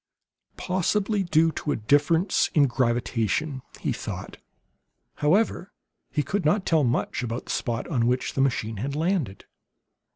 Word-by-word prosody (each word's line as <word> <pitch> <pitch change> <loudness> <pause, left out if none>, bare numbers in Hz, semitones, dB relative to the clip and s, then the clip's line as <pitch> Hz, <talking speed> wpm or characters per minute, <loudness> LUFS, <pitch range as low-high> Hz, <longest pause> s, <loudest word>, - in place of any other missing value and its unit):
"Possibly 195 +3 0
due 165 -2 +3
to 150 - -2
difference 150 - +2
in 145 -2 +6
gravitation," 125 +2 0 0.2
he - - 0
thought. - - -6 0.8
However, 195 +5 +1 0.4
he 150 - 0
could 195 +7 -2
not 185 +6 +2
tell 160 -3 +3
much 125 +1 0
about 120 0 -4
the - - -5
spot 120 -1 -2
on 120 -8 +1
which 125 +1 0
the 135 - 0
machine 115 -5 0
had 135 +7 -3
landed. 160 - -1
145 Hz, 135 wpm, -25 LUFS, 120-170 Hz, 0.8 s, in